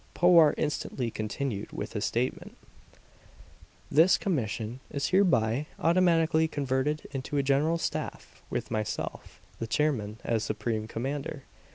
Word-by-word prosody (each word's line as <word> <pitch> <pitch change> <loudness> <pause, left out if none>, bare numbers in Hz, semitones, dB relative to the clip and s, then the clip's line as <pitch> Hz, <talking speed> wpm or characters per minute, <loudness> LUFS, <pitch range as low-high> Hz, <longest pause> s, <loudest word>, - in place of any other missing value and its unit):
Powart 170 -4 +6
instantly 135 -5 -2
continued 110 0 -3
with - - -5
his - - -1
statement: - - -2 1.3
"This 165 +5 +6
commission 120 - -2
is 140 -1 -2
hereby 145 - +3
automatically 165 -2 +3
converted 145 0 -1
into 135 +1 -3
a 140 - +2
general 145 +5 +2
staff, - - -5
with - - -3
myself, 110 -2 -4 0.2
the 115 - -3
chairman, 110 -7 0
as 115 -2 0
supreme 110 -2 -2
commander. 135 +4 -4
140 Hz, 115 wpm, -29 LUFS, 115-160 Hz, 1.3 s, Powart